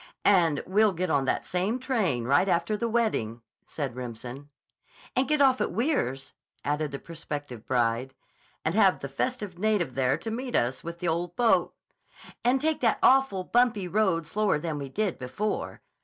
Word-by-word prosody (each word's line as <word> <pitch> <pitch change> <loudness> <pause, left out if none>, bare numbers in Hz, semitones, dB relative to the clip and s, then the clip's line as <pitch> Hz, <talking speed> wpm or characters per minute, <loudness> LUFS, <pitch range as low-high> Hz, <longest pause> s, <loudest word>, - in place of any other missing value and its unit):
"And 170 -7 +4
we'll 205 +2 +3
get 180 -1 -2
on 140 -2 +2
that - - -1
same 190 +7 0
train 220 - 0
right 145 +10 +3
after 170 +4 +1
the 230 +2 -2
wedding," 120 - -1 0.2
said 140 -6 -4
Remsen. 125 +3 -7 0.7
"And 255 +1 +2
get 300 0 +2
off 265 -2 +4
at - - 0
Weirs," 175 - -1 0.3
added 150 +1 0
the 140 - -5
prospective 145 -7 -7
bride. 125 +1 0 0.5
"And 160 - +1
have 195 -3 +4
the 140 - -4
festive 190 - -3
native 205 -9 +1
there 130 0 +1
to 225 - -5
meet 250 +2 -4
us 125 +2 0
with 170 +1 -7
'th' - - -3
ole 170 +2 0
boat.'" 225 +7 +2 0.7
"And 250 +2 +3
take 315 +2 0
that 230 -3 +2
awful, 265 -8 +4
bumpy 230 -3 +2
road 185 -4 +1
slower 205 +2 +1
than 150 -1 -3
we 140 -1 -5
did 205 +4 -2
before." 200 +12 -3
175 Hz, 170 wpm, -27 LUFS, 140-220 Hz, 0.7 s, And